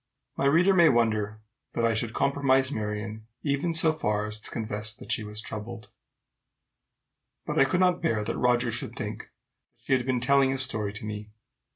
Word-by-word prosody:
My - - -1
reader 170 +7 +4
may 170 -3 +6
wonder 110 -3 0 0.3
that 115 - 0
I 115 - +2
should 110 0 -2
compromise 135 -1 +2
Marion, 105 -1 -5 0.2
even 140 +3 0
so 160 -1 +5
far 105 -8 -1
as 105 0 0
to - - -2
confess 110 -1 0
that - - -8
she 110 - +1
was 105 0 -2
troubled; 110 0 -7 1.6
but - - -1
I - - +6
could 180 +7 0
not 180 -1 +2
bear 115 -11 0
that - - -3
Roger 120 -1 +1
should 120 - -3
think - - -6 0.5
she - - -2
had 130 -1 +1
been 130 -2 +1
telling 135 +2 +3
his 135 0 +1
story 110 -5 -2
to 105 +1 -6
me. 105 0 -6
120 Hz, 185 wpm, -27 LUFS, 105-140 Hz, 1.6 s, may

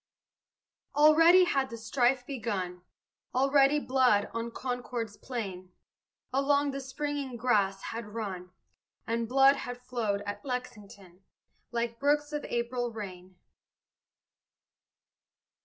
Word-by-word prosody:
Already 330 +5 +7
had 275 -6 +1
the 230 - -7
strife 245 +2 +1
begun; 200 -9 -4 0.5
Already 275 +2 +4
blood, 255 -7 +2
on 230 0 -3
Concord's 245 -3 -4
plain, 195 -8 -6 0.6
Along 280 +1 +2
the 275 - -4
springing 275 -1 -4
grass 200 -5 +1
had 230 -1 -5
run, 200 -5 -5 0.6
And 230 0 -2
blood 270 +2 +6
had 245 0 -5
flowed 230 -5 -2
at 205 0 -5
Lexington, 210 -8 -7 0.5
Like 235 0 -3
brooks 295 +1 +1
of 295 - -2
April 240 0 -2
rain. 185 -4 -8
245 Hz, 105 wpm, -29 LUFS, 210-275 Hz, 0.6 s, Already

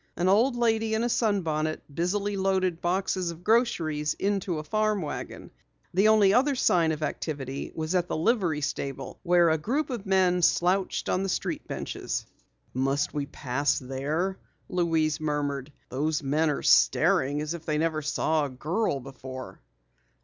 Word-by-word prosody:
An 175 +2 +1
old 230 +7 +4
lady 225 -2 +1
in 220 - 0
a 240 - +1
sunbonnet 165 -10 0
busily 200 +5 -1
loaded 190 -3 0
boxes 185 0 0
of 170 +1 -8
groceries 170 -10 +1
into 195 -4 -1
a 155 - -4
farm 215 +3 0
wagon. 150 - -6 0.4
The 195 +4 +4
only 210 -3 +5
other 275 +4 +3
sign 170 -9 +3
of 155 0 -3
activity 140 -3 -4
was 160 +2 -2
at 180 -1 +1
the - - -2
livery 170 -4 +1
stable 135 -2 -4
where 175 -2 +4
a 160 - +1
group 270 - -1
of 225 -5 -5
men 185 -2 +3
slouched 180 +3 +2
on 185 - +1
the 195 - -2
street - - -3
benches. - - -4 0.5
"Must 135 +3 0
we 145 -2 -2
pass 140 0 -1
there?" 150 +9 -2 0.3
Louise 160 -3 +1
murmured. 145 -2 -2 0.2
"Those 150 +4 -1
men 150 +4 +1
are 145 - -2
staring 135 - +4
as 150 +2 -3
if 170 -1 -9
they 155 -1 +1
never 160 0 0
saw 155 +1 0
a - - -4
girl 150 - -1
before." 130 0 -9
165 Hz, 160 wpm, -27 LUFS, 150-195 Hz, 0.5 s, only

